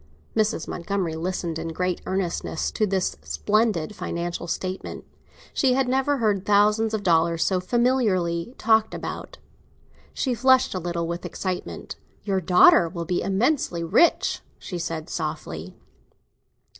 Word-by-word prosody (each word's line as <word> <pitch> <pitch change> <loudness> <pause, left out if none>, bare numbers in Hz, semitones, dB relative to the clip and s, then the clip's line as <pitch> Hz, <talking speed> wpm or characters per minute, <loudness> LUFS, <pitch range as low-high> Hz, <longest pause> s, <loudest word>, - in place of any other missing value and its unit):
Mrs. 215 -6 +1
Montgomery 175 -2 -2
listened 170 -1 -3
in 165 - -4
great 180 +2 -2
earnestness 185 -4 -2
to 215 - 0
this 190 -1 -1
splendid 190 - 0
financial 175 -2 -4
statement; 185 +2 -4 0.5
she 260 -2 +3
had 265 0 +1
never 270 +3 +1
heard 210 -5 +1
thousands 210 +2 +3
of 210 - -4
dollars 165 -2 +3
so 185 +2 +1
familiarly 215 -3 +1
talked 220 0 +3
about. - - -6 0.7
She 260 - -1
flushed 260 +2 +4
a 185 - -2
little 170 -1 -2
with 170 +1 -4
excitement. 185 -2 -5 0.3
"Your 195 -2 0
daughter 175 -1 +6
will 170 -1 -5
be 175 +1 0
immensely 195 - 0
rich," 250 - +3 0.2
she 180 - -6
said 165 -2 -4
softly. 90 - -5
185 Hz, 130 wpm, -24 LUFS, 170-220 Hz, 0.7 s, daughter